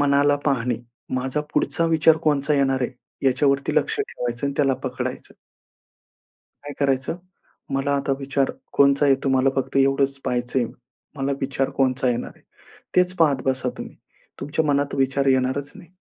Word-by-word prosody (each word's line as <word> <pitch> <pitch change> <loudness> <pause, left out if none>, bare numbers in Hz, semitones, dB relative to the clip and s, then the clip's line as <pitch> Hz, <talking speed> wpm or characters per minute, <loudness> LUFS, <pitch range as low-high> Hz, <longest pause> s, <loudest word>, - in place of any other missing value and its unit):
मनाला 145 0 +3
पाहणे. 125 -4 +1 0.4
माझा 130 +3 -1
पुढचा 165 - +1
विचार 160 0 +4
कोणचा 145 0 +1
येणार 135 -2 +1
आहे 125 - -1 0.4
याच्यावरती 135 +1 +2
लक्ष 445 0 +1
ठेवायचं 120 - -3
आणि 140 - -3
त्याला 135 -3 +3
पकडायचं. - - -4 1.3
काय 145 - -7
करायचं? 135 +2 0 0.6
मला 135 +1 0
आता 140 0 -1
विचार 135 0 0 0.2
कोणता 140 +1 +4
आहे 135 - +6
तुम्हाला 130 0 +3
फक्त 135 +1 -2
एवढंच 135 0 +2
पहायचंय. 125 0 0 0.5
मला 140 0 -1
विचार 135 0 -1
कोणता 130 -1 +2
येणार 120 - -3
आहे? - - -24 0.5
तेच 180 0 +3
पाहत 145 -5 +3
बसा 130 -1 0
तुम्ही. - - -8 0.4
तुमच्या 145 +3 -1
मनात 145 -1 +1
विचार 135 0 +1
येणारच 130 +2 +1
नाही. 190 -4 -14
135 Hz, 145 wpm, -23 LUFS, 130-145 Hz, 1.3 s, आहे